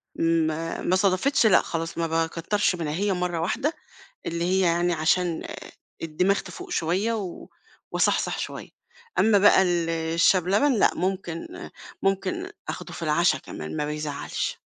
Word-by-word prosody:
ما 165 0 0
ما 185 - +1
صدفتش 195 +8 +2
لأ 215 - +6
خلاص، 165 0 -4
ما 165 0 0
باكترش 165 +5 0
منها، 160 -4 -3
هي 200 +3 0
مرّة 180 -2 -2
واحدة 280 - 0 0.5
اللي 170 0 -2
هي 185 +2 +2
يعني 175 -1 +2
عشان 165 +1 +1 0.6
الدماغ 180 +5 +1
تفوق 370 0 -10
شوية 195 - 0
و 195 -6 -6 0.4
واصحصح - - +1
شوية. - - -5 0.5
أمّا 215 -2 +5
بقى 195 -1 +6
ال 175 -2 +1
الشاي 165 +3 +3
بلبن، 200 - +2
لأ، - - +5
ممكن 185 - -4 0.3
ممكن 350 - -1 0.2
آخده - - -6
في - - -8
العشا 165 +3 +2
كمان، - - -7
ما 150 -1 -1
بيزعّلش، 150 -1 -3
175 Hz, 145 wpm, -25 LUFS, 165-195 Hz, 0.6 s, لأ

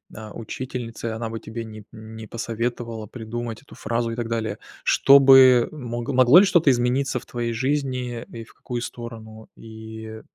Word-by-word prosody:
э, 110 0 -9
учительницей, 115 -1 -6
она 115 0 -4
бы 115 0 -5
тебе 115 +1 -7
не 110 -1 -10
не 110 0 -10
посоветовала 115 -1 -4
придумать 115 0 -6
эту - - -17
фразу 115 +1 -2
и - - -4
так 120 -1 -3
далее, 110 -2 -3 0.2
что 140 +1 +6
бы 130 -3 +7
мог 120 -5 -6
могло 130 +3 +6
ли 200 - +5
что-то 175 -6 +3
измениться 125 +1 +1
в - - -16
твоей 120 -1 -3
жизни 130 -2 -2
и 115 -1 -8
в 110 - -19
какую 120 -2 -6
сторону? 110 -2 -9
И 110 0 -10
115 Hz, 170 wpm, -23 LUFS, 110-125 Hz, 0.2 s, бы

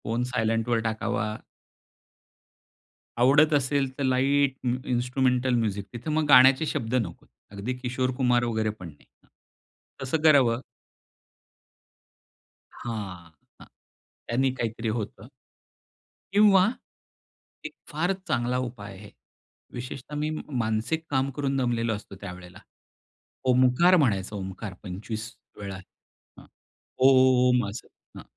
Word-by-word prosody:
Phone 115 +3 -1
सायलेंटवर 115 0 0
टाकावा. 110 -1 -2 1.9
आवडत 145 +5 +5
असेल 140 -1 +1
तर 140 - -2
लाईट 135 +1 +2
म 125 0 +1
इन्स्ट्रुमेंटल 125 +1 +1
म्युझिक. 105 -4 -1
तिथं 120 +6 -5
मग 155 0 +1
गाण्याचे 130 +3 +7
शब्द 130 -6 -2
नकोत. 105 -10 -3 0.2
अगदी 100 +5 -4
किशोर 130 +1 -2
कुमार 125 -2 +2
वगैरे 110 -2 0
पण 90 - -8
नाही. 75 -3 -16 0.2
हं, - - -29 0.7
तसं 145 +4 -1
करावं. 130 -6 +5 2.1
हां, 95 -8 -7 0.3
हां. - - -13 0.6
त्यांनी 130 +3 +1
काहीतरी 115 -2 -3
होतं. 110 0 -5 1.1
किंवा 200 -2 +6 1.0
एक - - -6 0.2
फारच 175 +6 0
चांगला 120 +1 0
उपाय 120 -6 -6
आहे. 105 +1 -12 0.6
विशेषतः 125 +3 -7
मी 150 +1 -1
म 155 - -4 0.2
मानसिक 115 +9 -1
काम 135 -1 +1
करून 140 -1 -1
दमलेलो 120 -3 0
असतो 100 -1 -10
त्यावेळेला. 90 -2 -10 0.9
ओमकार 130 +8 +5
म्हणायचं 105 - 0
ओमकार 95 +1 -6
25 110 +4 -6 0.3
वेळा. 100 -2 -6 0.6
हां. - - -14 0.6
ओम 125 -3 +4
असं. 105 - -8 0.3
हां. - - -9
125 Hz, 110 wpm, -26 LUFS, 110-135 Hz, 2.1 s, गाण्याचे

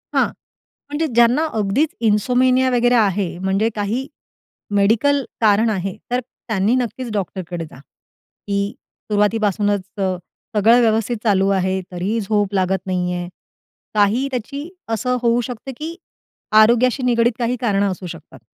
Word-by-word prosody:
हां. - - +4 0.6
म्हणजे 300 +2 -1
ज्यांना 240 +6 +4
अगदीच 220 +8 +1 0.2
इन्सोमेनिया 255 +4 +3
वगैरे 245 0 +3
आहे, 200 -5 +1
म्हणजे 195 +4 +1
काही 220 +6 -2 0.7
मेडिकल 235 +8 +3 0.2
कारण 220 +1 +4
आहे 195 -2 -2 0.2
तर 245 - +2
त्यांनी 220 -2 -1
नक्कीच 245 -1 -3
डॉक्टरकडे 180 -4 -4
जा. 155 -4 -14 0.7
की 200 +1 -1 0.4
सुरुवातीपासूनच 205 -1 +1 0.2
अ, 190 -2 0 0.4
सगळं 225 +4 +5
व्यवस्थित 225 +1 +1
चालू 195 -3 +3
आहे 190 0 0
तरीही 190 +6 -2
झोप 205 -1 0
लागत 190 -1 0
नाही 180 -1 -1
आहे. 175 0 -4 0.7
काही 215 +6 +2
त्याची 280 +6 -5 0.2
असं 250 +3 0
होऊ 235 0 +2
शकतं 245 +2 -6
की 320 +2 -5 0.7
आरोग्याशी 245 +4 +3
निगडीत 240 -1 +3
काही 240 +1 0
कारणं 200 -3 +1
असू 185 0 -7
शकतात. 165 -2 -11
215 Hz, 135 wpm, -20 LUFS, 195-245 Hz, 0.7 s, सगळं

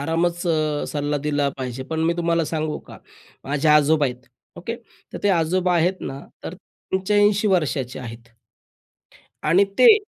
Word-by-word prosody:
आरामच 170 +3 0 0.5
सल्ला 145 0 -1
दिला 145 -1 +1
पाहिजे. 130 -1 -5
पण 160 +4 -4
मी 170 - +2
तुम्हाला 170 -1 +1
सांगू 155 0 -2
का - - -11 0.5
माझे 145 +2 0
आजोबा 150 0 +4
आहेत 125 +1 -7 0.3
ओके 230 +6 -5 0.4
तर - - -5
ते 205 - +2
आजोबा 180 +1 +2
आहेत 175 +3 +2
ना 135 - -6 0.2
तर - - -6 0.4
85 205 +2 +2
वर्षाचे 150 -8 0
आहेत. 115 -1 -9 1.2
आणि 175 +6 +4
ते 450 -4 +8
160 Hz, 140 wpm, -22 LUFS, 145-180 Hz, 1.2 s, ते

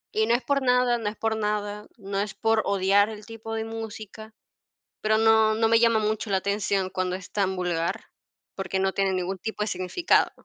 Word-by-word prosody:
Y 220 0 +2
no 235 - +4
es 240 - -2
por 280 -1 +1
nada, 250 -1 +3
no 215 -2 -1
es 210 - -9
por 225 +1 -1
nada, 210 -1 -2
no 195 -2 -4
es 200 0 -3
por 225 -1 +2
odiar 200 +1 +3
el 215 -1 -9
tipo 225 -1 -7
de 220 0 -2
música, 220 -1 -8 0.7
pero 215 0 +2
no, 220 -1 +5
no 225 +1 +2
me 225 0 +4
llama 230 -1 +4
mucho 215 0 -2
la 195 - +3
atención 200 -1 -1
cuando 185 -1 -2
es 185 0 -9
tan 190 -2 0
vulgar, 175 -2 -2 0.5
porque 195 0 -2
no 190 0 +1
tiene 195 0 0
ningún 185 +1 -2
tipo 220 +3 -5
de 210 - 0
significado. 185 - +1
210 Hz, 205 wpm, -26 LUFS, 195-225 Hz, 0.7 s, no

